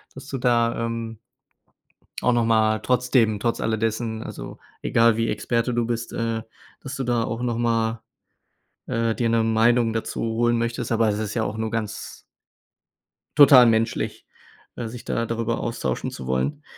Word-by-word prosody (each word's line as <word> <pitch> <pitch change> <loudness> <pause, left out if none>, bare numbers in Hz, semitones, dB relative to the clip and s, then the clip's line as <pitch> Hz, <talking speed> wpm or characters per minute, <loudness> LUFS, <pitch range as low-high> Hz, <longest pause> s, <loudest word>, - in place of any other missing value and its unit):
dass 135 - -10
du 135 - -4
da, 115 -1 +1
ähm 115 -1 -5 1.0
auch 125 - +3
noch 120 -1 +2
mal 110 -1 +3
trotzdem, 125 -4 +2
trotz 115 +1 -1
alle 110 0 0
dessen, 110 0 -2
also, - - -8 0.2
egal 115 -1 +3
wie 115 - 0
Experte 120 +1 -1
du 120 -1 +1
bist 115 0 -3
äh, 115 -1 -2 0.4
dass 135 0 -6
du 135 - -3
da 120 -2 +1
auch 115 +2 -4
noch 120 -2 -1
mal, 115 -1 0 0.9
äh, 115 -1 0
dir 115 -2 0
'ne 115 -1 +2
Meinung 115 +1 +3
dazu 115 - -3
holen 115 +1 +1
möchtest, 115 0 -2
aber 115 -1 +3
es 105 +1 -1
ist 105 -1 -3
ja 110 - +1
auch 110 - -3
nur 110 0 -2
ganz 110 -3 -5 1.2
total 135 -4 +9
menschlich, 115 0 0 0.5
äh, 120 -2 -4
sich 120 +1 -9
da 115 -1 -1
darüber 115 0 -2
austauschen 115 - -2
zu 65 - -8
wollen. 65 - -1
115 Hz, 170 wpm, -23 LUFS, 110-120 Hz, 1.2 s, total